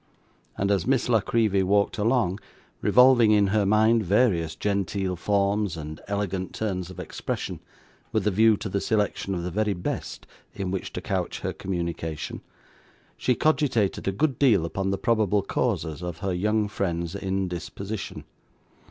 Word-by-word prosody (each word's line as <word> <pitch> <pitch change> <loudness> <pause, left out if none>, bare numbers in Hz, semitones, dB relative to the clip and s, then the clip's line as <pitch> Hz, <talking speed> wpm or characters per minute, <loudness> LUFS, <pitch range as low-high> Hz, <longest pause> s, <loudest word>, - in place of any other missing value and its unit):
And 100 +1 +1
as 95 -4 +1
Miss 130 -2 +2
La 115 -2 +5
Creevy 105 -2 +2
walked 100 +3 +1
along, 110 -4 +1 0.4
revolving 125 -3 +6
in 105 -1 +5
her 105 -2 +2
mind 110 +2 +4
various 95 -5 +2
genteel 100 -2 -1
forms 100 0 0
and 75 0 -7
elegant 95 -3 -2
turns 95 -5 -2
of 95 - -10
expression, - - -4 0.5
with - - 0
a 105 - +3
view 110 +2 +4
to 105 - -5
the 100 0 -1
selection 105 -2 0
of 85 - -3
the 90 - -3
very 105 +1 0
best 90 - -5 0.3
in 95 -2 -3
which 95 - -3
to - - -4
couch - - -2
her - - -2
communication, 85 -4 -4 0.7
she 125 - +1
cogitated 130 -11 +1
a - - +3
good 135 +5 0
deal 110 - +4
upon 95 +3 -2
the 95 - 0
probable 105 -4 +2
causes 80 -4 -1
of 90 -2 -5
her 95 +1 -2
young 105 +4 +1
friend's 85 -4 -2
indisposition. 95 +1 -4
100 Hz, 155 wpm, -26 LUFS, 90-110 Hz, 0.7 s, revolving